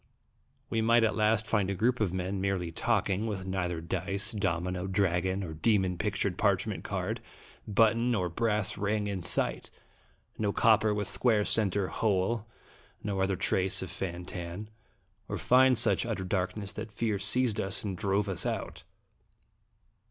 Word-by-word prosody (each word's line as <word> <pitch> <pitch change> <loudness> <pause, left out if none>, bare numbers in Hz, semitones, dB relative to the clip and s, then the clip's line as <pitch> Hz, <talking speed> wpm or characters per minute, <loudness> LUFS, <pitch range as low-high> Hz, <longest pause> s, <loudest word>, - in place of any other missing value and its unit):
We 115 - +1
might 115 +1 +4
at 110 - +2
last 110 0 +2
find 105 -3 +1
a 100 - -1
group 120 +6 +1
of 105 -5 +1
men 95 +1 -3
merely 95 -3 -1
talking, 105 +1 0
with 100 -3 -4
neither 90 -3 -2
dice, 95 +3 -1
domino, 90 -2 -2
dragon, 95 0 0
or 80 -4 -5
demon 95 +2 +1
pictured - - -1
parchment - - +1
card, - - -3 0.5
button, 115 +3 +3
nor 100 -7 +1
brass 105 +2 -1
ring, 105 +1 0
in 100 -2 -3
sight - - 0 0.7
no 105 -2 +1
copper 110 0 +4
with 105 -1 -1
square 110 -5 +2
centre 100 -3 +1
hole, 110 +2 0 0.6
nor 100 -2 -2
other 95 0 +1
trace 95 +1 +1
of 90 - -7
Fan 90 -1 -4
Tan; 90 +3 -6 0.6
or - - -2
find 130 0 +5
such 100 -4 +4
utter 110 -5 -3
darkness 95 +1 -2
that 110 0 -6
fear 105 -1 -1
seized 120 -1 +1
us 95 -1 -2
and 100 -3 -3
drove 100 +2 0
us 95 -4 0
out. - - -3
100 Hz, 155 wpm, -30 LUFS, 95-110 Hz, 0.7 s, find